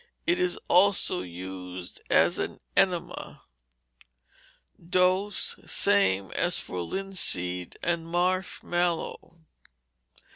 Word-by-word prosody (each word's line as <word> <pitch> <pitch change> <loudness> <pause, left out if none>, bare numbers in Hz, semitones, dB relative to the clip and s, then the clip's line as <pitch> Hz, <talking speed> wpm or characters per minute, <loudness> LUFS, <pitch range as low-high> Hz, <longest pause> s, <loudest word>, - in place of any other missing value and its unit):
It 345 +1 +1
is 365 +3 0
also 185 -1 +5
used 90 0 -7
as - - +4
an - - -4 0.2
enema. 180 -3 0 1.4
Dose, 185 +3 +1
same 95 -1 +2
as - - +2
for 90 - -4
linseed 90 - -2
and 170 -1 -1
marsh 180 +2 -1
mallow. 170 -1 -2
170 Hz, 85 wpm, -27 LUFS, -, 1.4 s, also